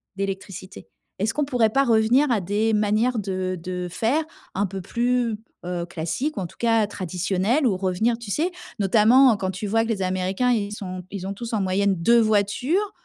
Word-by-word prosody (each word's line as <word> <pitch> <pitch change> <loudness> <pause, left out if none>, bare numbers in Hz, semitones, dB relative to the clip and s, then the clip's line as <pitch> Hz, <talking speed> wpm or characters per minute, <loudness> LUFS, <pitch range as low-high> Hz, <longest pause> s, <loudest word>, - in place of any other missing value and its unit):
d'électricité? 190 - -6 0.3
Est-ce 220 +3 0
qu'on 295 -1 0
pourrait 240 -6 +2
pas 275 +2 +3
revenir 235 +5 +3
à 220 -4 +2
des 210 +4 0
manières 215 +4 +1
de 185 -2 -2
de 180 0 -4
faire 250 - +1 0.3
un 200 +2 +1
peu 190 +1 -6
plus, 235 +3 0 0.3
heu, 175 -1 -3
classiques 170 - -3
ou - - -1
en 180 - -2
tout - - -19
cas 225 -2 +3
traditionnelles? 190 - -1
Ou 205 - +1
revenir, 195 +5 0
tu 235 - -9
sais, 330 - 0 0.3
notamment 225 +5 +5
quand 190 -1 -2
tu 185 +3 -5
vois 225 +3 +2
que 230 - -4
les 210 -4 -1
Américains, 185 +6 0
ils 210 -4 0
sont 185 -3 -6
ils 195 -2 -5
ont 195 - -3
tous 230 +3 -7
en 210 - +1
moyenne 195 +1 +1
2 235 +8 +4
voitures, 225 - +1
205 Hz, 195 wpm, -23 LUFS, 185-235 Hz, 0.3 s, notamment